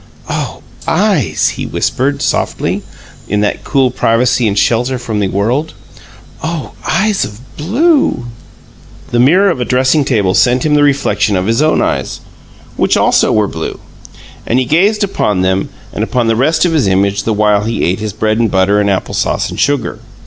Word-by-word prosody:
"Oh, - - -4 0.2
eyes!" - - +1
he - - -4
whispered, 140 +2 -1
softly, - - -1 0.5
in 105 +1 0
that 105 - -1
cool 135 -3 +1
privacy 120 0 +1
and 100 -1 -1
shelter 120 +5 +1
from 115 -3 -4
the 100 - +1
world. 120 +12 -1 0.7
"Oh, 160 -3 -4 0.2
eyes 205 +1 +1
of 105 0 -7 0.2
blue!" 245 - +1 0.9
The 120 - +1
mirror 180 +10 +4
of 130 - -3
a - - +2
dressing 130 +4 +2
table 105 -9 +1
sent 125 +5 +2
him 150 - +2
the 150 - +4
reflection 140 -7 +1
of 90 0 0
his 115 +6 +1
own 155 0 +2
eyes, - - -2 0.6
which - - +2
also - - +3
were 105 -1 +2
blue; 80 -3 -5 0.7
and 120 - +1
he 130 - +1
gazed 200 - +2
upon 105 - 0
them 95 +1 0 0.2
and - - -2
upon 125 -2 0
the 115 0 +2
rest 155 +9 +2
of 170 - +1
his 145 -10 +2
image 100 +1 +1
the 110 - -2
while 105 -1 +2
he 115 0 -2
ate 90 +4 0
his 110 -1 -3
bread 110 +3 -1
and 115 -1 +2
butter 100 +2 +2
and 100 - +1
apple 95 - -1
sauce - - -1
and - - -6
sugar. 145 -1 0
120 Hz, 180 wpm, -13 LUFS, 105-145 Hz, 0.9 s, mirror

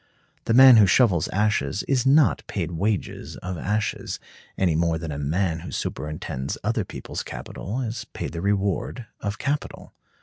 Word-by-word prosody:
The 115 - +2
man 130 -1 +10
who 105 -3 +7
shovels 90 - +4
ashes 100 -5 0
is 135 -2 +1
not 145 +1 +5
paid 85 -4 -3
wages 100 +4 -2
of 90 +1 -5
ashes, 105 +3 -2 0.4
any 90 -4 +2
more 85 0 +1
than 80 -1 -5
a 70 - -4
man 80 +3 0
who 85 - -8
superintends 75 -3 -4
other - - 0
people's - - -6
capital 115 +7 -5
is 120 -1 -4
paid - - -5
the 85 - -5
reward 100 +4 -1
of 100 0 -3
capital. 145 +5 -3
100 Hz, 160 wpm, -24 LUFS, 85-110 Hz, 0.4 s, man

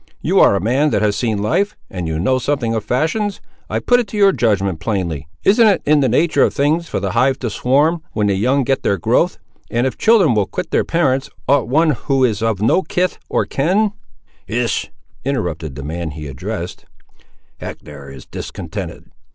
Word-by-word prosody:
You - - +2
ar' - - +6
a - - +1
man 130 - +2
that - - 0
has 105 -1 +2
seen 105 -2 -1
life, 195 - 0
and 90 -3 -5
you 80 -1 -2
know 130 +10 +1
something 130 -4 -1
of 110 -2 -2
fashions; 195 - -1 0.3
I - - -1
put 245 0 +3
it 240 - -2
to 210 - -6
your 200 -1 +6
judgment, 100 - 0
plainly, 85 -10 -3 0.2
isn't 220 +3 +5
it 200 - +2
in 150 0 +4
the 135 - +2
nature 165 0 +2
of - - +3
things 155 +4 +1
for - - -2
the - - -2
hive 135 0 +2
to 120 -4 -4
swarm 145 +9 +2
when 105 - 0
the 100 - +2
young 130 +8 +1
get 135 +2 0
their 100 - +1
growth, 80 - +1 0.3
and 120 +2 0
if 130 - -3
children 210 - +4
will 105 -2 +1
quit 175 - -5
their - - +2
parents, 135 -6 0 0.2
ought 135 -3 +3
one 155 +5 +3
who 135 0 0
is 110 -4 +1
of 110 -3 0
no 115 +11 +3
kith 180 +2 -1
or - - +1
kin—" 195 +9 +1 0.6
"Hist!" 120 0 -1 0.3
interrupted 85 - -3
the 70 - -7
man 80 +3 -4
he 75 +1 -8
addressed, 65 -2 -6 0.7
"Hector 70 - -9
is 65 -2 -11
discontented. - - -7
125 Hz, 200 wpm, -18 LUFS, 100-155 Hz, 0.7 s, ar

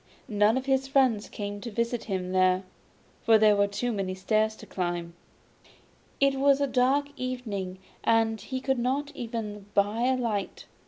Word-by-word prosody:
None 210 +2 +3
of 260 - -3
his 270 0 +1
friends 260 -6 +2
came 205 -1 -5
to 235 - -5
visit 235 +1 -2
him 185 -3 -3
there, 185 0 +3 0.6
for 225 -1 +5
there 215 -1 +5
were 200 0 +3
too 240 +5 -2
many 195 -3 -2
stairs 215 +3 +1
to - - -12
climb. 175 -2 -3 1.1
It 275 -1 +3
was 280 0 +4
a 285 - +2
dark 270 +2 +2
evening, 215 -8 -4 0.3
and 225 -1 +2
he 260 -1 -5
could 265 -1 0
not 275 +4 -1
even 220 -5 -5
buy 210 +4 +2
a 260 0 +2
light. 220 -5 -3
225 Hz, 165 wpm, -27 LUFS, 200-255 Hz, 1.1 s, for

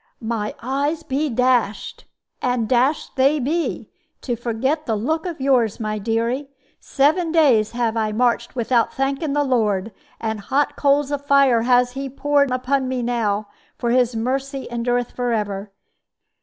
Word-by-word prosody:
"My 220 -2 -3
eyes 285 +5 -1
be 290 +2 -1
dashed! 245 -4 0 0.4
And 245 -3 0
dashed 260 +5 +1
they 275 +3 +3
be, 315 +6 -2 0.3
to 245 - -2
forget 250 +7 -2
the 225 - +1
look 315 - -1
of 335 -4 -5
yours, 255 -6 +2
my 215 -1 -2
dearie. 230 +6 -1 0.3
Seven 315 +5 +1
days 255 -10 +3
have 235 -2 0
I 220 -1 0
marched 240 +4 0
without 235 -1 +1
thanking 275 +2 -1
the 290 0 +2
Lord; 220 -6 0 0.3
and 220 -1 -3
hot 275 +8 0
coals 285 0 +2
of 285 -1 -2
fire 275 -5 +5
has 245 +1 +3
He 270 +1 -5
poured 285 +1 +1
upon 255 +1 0
me 255 -1 -2
now, 215 -4 -1 0.3
for 235 - -1
His 245 -1 +2
mercy 270 +4 -2
endureth 245 +1 -1
forever. 210 -5 -2
250 Hz, 150 wpm, -21 LUFS, 230-275 Hz, 0.4 s, fire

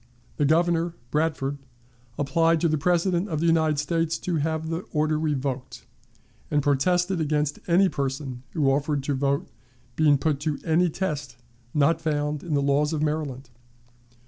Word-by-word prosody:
The 145 - +2
Governor 170 +2 +2 0.2
(Bradford) 150 -3 -1 0.6
applied 165 +4 +2
to 170 - +3
the 155 -1 0
President 175 +3 +1
of 155 -3 -2
the 165 - 0
United 160 -2 +3
States 165 +3 0
to 175 -3 -2
have 160 +1 -1
the 165 - -1
order 155 0 +1
revoked, 140 -4 -3 0.6
and 145 -2 +1
protested 175 +6 +2
against 150 -1 0
any 180 +3 +5
person 135 -4 -3
who 145 -4 +2
offered 145 0 0
to 145 - -1
vote 140 +1 0 0.5
being 150 -2 +4
put 145 0 0
to 150 -1 -2
any 170 +2 +3
test 150 -7 -3 0.4
not 155 +3 +3
found 150 -2 -1
in 160 -4 -2
the 140 - +1
laws 145 +2 +2
of 155 -1 -1
Maryland. 145 -4 -3
150 Hz, 155 wpm, -25 LUFS, 140-165 Hz, 0.6 s, any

